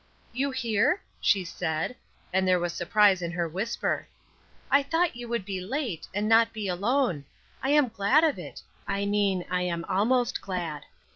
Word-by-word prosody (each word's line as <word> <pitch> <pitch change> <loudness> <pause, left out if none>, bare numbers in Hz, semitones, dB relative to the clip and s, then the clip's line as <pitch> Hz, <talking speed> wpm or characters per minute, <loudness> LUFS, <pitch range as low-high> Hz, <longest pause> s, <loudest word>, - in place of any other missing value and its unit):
"You 270 +3 0
here?" 245 - +1 0.2
she 195 -2 +2
said, 160 +5 -2 0.4
and 190 0 +2
there 185 0 +4
was 175 -1 -2
surprise 195 +1 +3
in 170 - -2
her 170 -1 -1
whisper. 195 +8 -2 0.8
"Thought 330 -3 +2
you 240 0 -7
would 235 -4 -2
be 195 -2 -4
late, 225 - -3
and 205 +2 -1
not 225 +1 +4
be 215 -3 -4
alone. 200 - 0 0.4
I 265 - -1
am 290 -3 +4
glad 225 +8 +3
of 315 -3 +2
it - - -9 0.2
I 200 0 -1
mean 200 -3 +1
I 180 0 +1
am 170 -2 -2
almost 235 +6 +1
glad. 170 -6 -4
200 Hz, 165 wpm, -27 LUFS, 180-240 Hz, 0.8 s, there